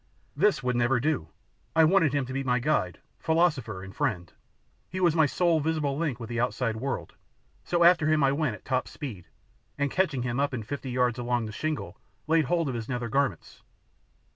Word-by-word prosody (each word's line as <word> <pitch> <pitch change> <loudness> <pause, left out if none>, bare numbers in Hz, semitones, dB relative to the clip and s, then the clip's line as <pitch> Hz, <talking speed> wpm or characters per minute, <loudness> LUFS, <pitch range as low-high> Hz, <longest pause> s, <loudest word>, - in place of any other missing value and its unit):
This 180 -2 +2
would 125 -1 0
never 120 +1 +2
do! 140 - -1 0.5
I 160 - +6
wanted 165 -3 +4
him 140 -2 0
to 130 - -7
be 135 +1 -2
my 125 -2 +1
guide, 120 -9 0 0.2
philosopher, 150 - +1
and 95 +1 -10
friend. 95 - -2 0.6
He 185 - -4
was 175 -3 +3
my 160 -2 +4
sole 170 +2 +2
visible 150 -2 -1
link 145 -6 -2
with 115 - -6
the 120 0 -3
outside 120 -2 -1
world, 135 +3 -4 0.5
so 170 -1 +1
after 170 -3 +5
him 155 -1 +3
I 135 - +4
went 140 -5 0
at 95 - -16
tip - - -16
top 130 -1 0
speed, 110 - -8 0.5
and 140 -1 0
catching 155 -10 0
him 120 +1 -2
up 140 -2 0
in 115 - -4
fifty 135 +3 -5
yards 125 -1 +1
along 120 -1 0
the 110 - -6
shingle 155 +7 -4 0.3
laid 160 0 +3
hold 165 +3 +1
of 130 - -2
his 115 0 -5
nether 120 -2 -2
garments. 135 - -1
135 Hz, 205 wpm, -27 LUFS, 120-155 Hz, 0.6 s, I